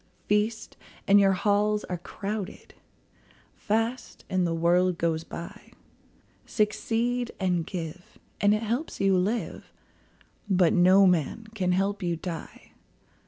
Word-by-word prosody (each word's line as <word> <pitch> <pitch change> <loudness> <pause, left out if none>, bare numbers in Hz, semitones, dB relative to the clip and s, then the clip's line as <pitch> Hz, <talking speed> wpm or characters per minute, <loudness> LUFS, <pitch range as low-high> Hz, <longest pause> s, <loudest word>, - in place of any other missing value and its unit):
Feast, 210 +2 -1 0.3
and 200 +1 +7
your 195 -1 +4
halls 210 +2 +1
are 180 -2 -5
crowded; 200 +2 -6 0.8
Fast, 225 +4 -2
and 185 -2 +2
the 165 - -1
world 175 +2 +2
goes 165 -1 0
by. 170 +1 -10 0.7
Succeed 235 +3 -1
and 180 -4 0
give, 175 0 -7 0.2
and 205 +1 +4
it 215 - -3
helps 240 +8 -3
you 195 -1 +3
live, 205 +6 -2 0.8
But 180 -3 +4
no 185 +2 +6
man 180 +4 +1
can 185 -4 0
help 200 +2 0
you 175 -2 -1
die. 165 0 -8
195 Hz, 120 wpm, -27 LUFS, 180-210 Hz, 0.8 s, and